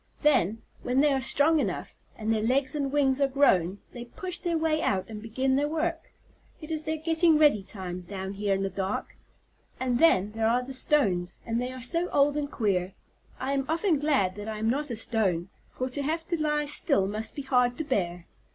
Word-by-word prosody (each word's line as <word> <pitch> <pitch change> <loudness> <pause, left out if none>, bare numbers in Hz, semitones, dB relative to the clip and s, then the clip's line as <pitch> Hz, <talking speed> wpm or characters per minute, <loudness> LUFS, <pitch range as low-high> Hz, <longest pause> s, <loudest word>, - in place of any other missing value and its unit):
Then, 225 - +2 0.2
when 250 +2 0
they 290 0 +4
are 265 - 0
strong 300 +4 +3
enough, - - -3 0.2
and 220 0 0
their 220 - 0
legs 260 +4 +1
and 280 -3 -1
wings 275 -1 +2
are 275 - +4
grown, 200 -10 +3 0.2
they 240 - -7
push 360 +8 -5
their 345 -2 -1
way 315 -1 +1
out 190 -1 0
and 215 -2 -8
begin 260 +4 0
their 290 +2 +1
work. 325 +2 -2 0.5
It 310 -1 -9
is 310 -1 -1
their 315 0 -1
getting 325 0 +3
ready 295 -9 +5
time, 185 -2 -6
down 190 0 -5
here 200 0 0
in 195 - -2
the 195 - -1
dark. 190 +2 -3 0.6
And 250 -2 0
then, 210 - +4
there 220 0 0
are 245 +2 +2
the 265 +2 -7
stones, 200 -11 +1
and 230 0 -1
they 250 +1 -3
are 255 -1 -8
so 335 +7 +1
old 285 +1 +3
and 290 -1 -2
queer. 190 -4 0 0.5
I 265 +2 -1
am 275 -1 0
often 330 -1 +1
glad 275 -11 +2
that 205 +1 -6
I 220 -1 -4
am 220 +2 +1
not 290 +3 -2
a 235 - -3
stone, 195 -6 0 0.2
for 255 - -4
to 285 +3 -2
have 320 +3 -2
to 340 -3 -1
lie 300 -1 +1
still 280 - +1
must 215 +2 -4
be 285 - -5
hard 250 -2 +2
to 315 - -2
bear. 180 - -2
260 Hz, 215 wpm, -27 LUFS, 210-300 Hz, 0.6 s, ready